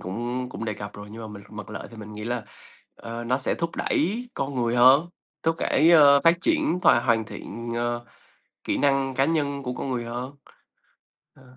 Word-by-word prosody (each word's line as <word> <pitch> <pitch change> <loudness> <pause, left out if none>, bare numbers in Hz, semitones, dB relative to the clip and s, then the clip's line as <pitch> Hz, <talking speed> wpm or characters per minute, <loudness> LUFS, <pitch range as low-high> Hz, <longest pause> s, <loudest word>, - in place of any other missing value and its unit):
cũng 120 +6 -4
cũng 115 - -6
đề 105 -2 -2
cập 100 0 -7
rồi, 105 0 -9
nhưng 110 +2 -9
mà - - -6
mình 100 -1 -10
mặt 105 -2 -8
lợi 105 - -7
thì 115 - -12
mình 105 0 -9
nghĩ 105 +1 -7
là, 120 -2 -3 0.5
ờ, 115 +1 -7
nó 125 +2 +1
sẽ 130 - -1
thúc 165 -1 -4
đẩy 225 +10 0
con 135 +1 -3
người 120 -1 0
hơn, 135 +7 +6 0.3
thúc 165 - +2
đẩy, 160 +5 +3
ơ, 145 -4 +7
phát 165 +1 +6
triển 310 - +1
thòa 120 - +6
hoàn 115 -2 +2
thiện, 115 +3 -7
ờ, 120 0 -2 0.6
kỹ - - -1
năng 135 -1 +1
cá 135 - +3
nhân 140 -3 -1
của 125 -1 -3
con 135 - -5
người 120 -2 -2
hơn. 125 +4 -6 1.0
Ờ. 130 -1 -19
125 Hz, 210 wpm, -25 LUFS, 115-140 Hz, 1.0 s, ơ